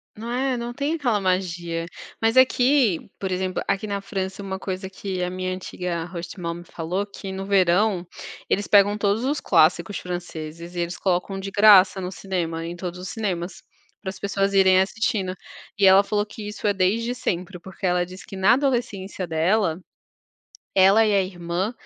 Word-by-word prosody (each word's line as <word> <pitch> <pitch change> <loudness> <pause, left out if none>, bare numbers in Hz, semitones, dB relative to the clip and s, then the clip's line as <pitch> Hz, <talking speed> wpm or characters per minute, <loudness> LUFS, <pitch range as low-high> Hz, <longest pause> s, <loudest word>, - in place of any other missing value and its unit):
Não 230 +2 -6
é, 255 +1 0
não 240 0 -4
tem 285 +5 -1
aquela 245 -9 +1
magia. 175 -3 -1 0.4
Mas 225 +2 +2
aqui, 260 - +4
por 190 -1 -3
exemplo, 185 0 -1
aqui 195 +1 0
na 200 -1 -3
França, 190 0 -4
uma 190 -1 -5
coisa 190 0 -5
que 190 -1 -5
a 180 - -1
minha 185 0 -3
antiga 180 -2 -4
hostmom 175 -1 -6
falou 175 +4 -3
que 200 -1 -8
no 190 0 -5
verão, 190 0 +2 0.4
eles 205 - 0
pegam 205 0 +5
todos 205 +2 +1
os 285 +3 0
clássicos 170 +3 +3
franceses 170 -1 -7
e - - -3
eles 175 0 -2
colocam 190 +1 -1
de 195 0 -5
graça 200 -2 +6
no 180 +1 -4
cinema, 170 -4 -3
em 170 +1 -5
todos 180 0 -6
os 180 0 -6
cinemas, 185 -5 -3 0.4
pras 190 -2 -6
pessoas 200 0 0
irem 190 -1 +5
assistindo. 195 -1 -1 0.4
E 200 - +4
ela 190 +1 +7
falou 205 +1 0
que 215 0 -9
isso 210 +1 -7
é 205 - +3
desde 215 +6 +1
sempre 180 -5 -3
porque 190 +2 -8
ela 180 -1 +2
disse 185 +2 -11
que - - -9
na 190 +4 +4
adolescência 235 -9 -1
dela, 165 +2 +1 1.0
ela 195 +4 +6
e 210 - +2
a 195 - +4
irmã, 180 +3 -3
190 Hz, 175 wpm, -23 LUFS, 180-205 Hz, 1.0 s, ela